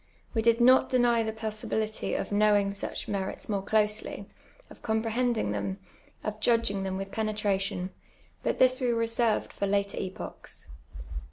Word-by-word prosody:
AVe 225 - +2
did 230 +1 +4
not 255 +2 +6
deny 240 -2 +4
the 220 -1 -1
possibility 220 0 -2
of - - -2
knowin^^ 205 -1 +3
such 200 - -4
merits 195 -2 -3
more 200 -2 0
closely, 210 +1 0 0.4
of - - -14
comprehending 225 - 0
them, 100 -2 -2 0.5
of 215 0 -3
judLrin^ 225 -4 +2
them 190 0 -2
with 195 0 -5
penetration, 200 -3 -1 0.5
but - - 0
this 255 +1 +4
we 250 - +2
reserved 230 -1 +1
for 200 - -1
later 200 0 0
epochs. 185 - -6
215 Hz, 145 wpm, -29 LUFS, 200-230 Hz, 0.5 s, not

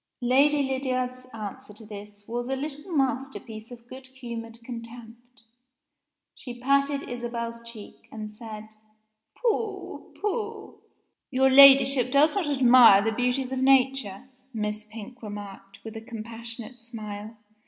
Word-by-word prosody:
Lady 280 +4 +4
Lydiard's 255 -1 -2
answer 215 -3 -8
to 220 - -5
this 205 -1 -11
was 240 +2 -3
a 270 - 0
little 295 +5 -6
masterpiece 265 -6 -2
of 240 -1 -13
good 260 +1 -11
humored 235 -3 -8
contempt. 235 +1 -11 0.9
She 245 -2 -9
patted 275 +2 +2
Isabel's 235 -1 -5
cheek, 230 -3 -11
and 215 -1 -7
said, 215 -1 -9 0.7
"Pooh! 435 -4 -3
Pooh!" 425 0 -4 0.5
"Your 265 0 +3
Ladyship 270 -2 +8
does 290 +3 +5
not 385 -7 -1
admire 245 -7 +7
the 225 - +1
beauties 250 +3 -1
of 260 - -2
Nature," 260 -5 +2 0.3
Miss 210 0 -3
Pink 225 +3 -11
remarked, 205 -2 -9
with 225 0 -8
a 220 - -6
compassionate 230 +1 -8
smile. 215 -1 -8
245 Hz, 125 wpm, -26 LUFS, 225-270 Hz, 0.9 s, Ladyship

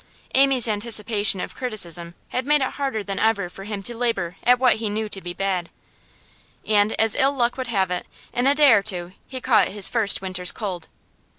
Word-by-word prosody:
Amy's 270 -3 +4
anticipation 210 -2 +1
of - - -5
criticism 175 -8 -2
had 255 - -2
made 295 -2 +3
it 260 - -2
harder 270 -7 -3
than 195 -1 -4
ever 205 -5 0
for 195 - -10
him 205 -2 -6
to 240 +4 -5
labour 210 -7 -2
at 250 +1 +4
what 255 -2 +3
he 220 -1 -3
knew 215 +1 -3
to 195 -2 -7
be 175 - -6
bad. 185 -2 -2 1.0
And, 210 0 +2
as 220 -1 +3
ill 275 +1 +2
luck 245 -2 0
would 260 -2 -4
have 195 -6 0
it, 180 - -3 0.3
in 245 +2 0
a 280 - +4
day 290 -4 +6
or 205 - +4
two 180 -3 -3
he 260 - -7
caught 230 -5 +3
his 200 -1 +4
first 220 -4 +3
winter's 185 -1 0
cold. 185 -6 -5
215 Hz, 205 wpm, -22 LUFS, 195-245 Hz, 1.0 s, day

